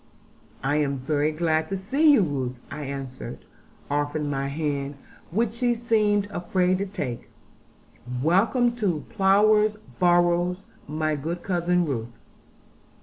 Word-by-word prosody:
'I 135 +2 +1
am 140 -2 0
very 145 +3 0
glad 160 0 0
to 195 - -2
see 275 +11 +3
you, 250 - +5
Ruth,' 130 -5 -2
I 150 - -5
answered, 135 - -7 0.4
offering 145 +1 -1
her 145 - -2
my 135 0 -1
hand, 140 -1 -2 0.3
which 215 +4 0
she 240 0 +1
seemed 215 -3 +2
afraid 180 +1 +1
to 200 - -2
take, 125 -10 -5 0.9
'welcome 225 - +3
to 180 -10 -1
Plover's 210 +1 +4 0.2
Barrows, 175 0 +3 0.3
my 155 +1 -1
good 165 +5 -4
cousin 180 -1 +1
Ruth.' 120 -5 -4
170 Hz, 130 wpm, -25 LUFS, 145-200 Hz, 0.9 s, you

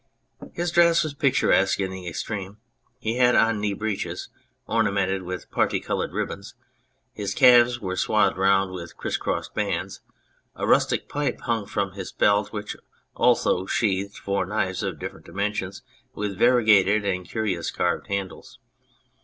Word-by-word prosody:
His 175 0 -2
dress 170 0 +5
was 155 -2 -4
picturesque 130 -10 +2
in 95 -1 -1
the 95 -1 -8
extreme: 100 +2 -5 0.4
he 115 -1 -3
had 125 -1 +4
011 115 -2 +3
knee 105 -1 0
breeches 105 0 -4 0.4
ornamented 100 -4 0
with 90 0 -7
parti - - +1
coloured - - -3
ribbons, - - -5 0.6
his 100 -1 -4
calves 120 -2 +6
were 95 -4 -4
swathed 100 +1 +2
round 95 0 +2
with 85 -2 -8
criss - - -3
cross - - -2
bands, - - -3 0.5
a - - -3
rustic - - +2
pipe 145 0 -2
hung 115 -4 -2
from 100 -2 -2
his 95 -1 -7
belt, 105 0 +2
which 105 -1 -5 0.4
also 95 +1 +2
sheathed 100 -2 -1
four 100 -1 -1
knives 95 -2 -1
of 95 -5 -3
different - - -8
dimensions 100 -1 -3 0.3
with 105 -1 -3
variegated 110 -3 +4
and 90 -2 -2
curious 100 -7 -2
carved - - -1
handles. 100 -2 -5
100 Hz, 145 wpm, -24 LUFS, 95-115 Hz, 0.6 s, calves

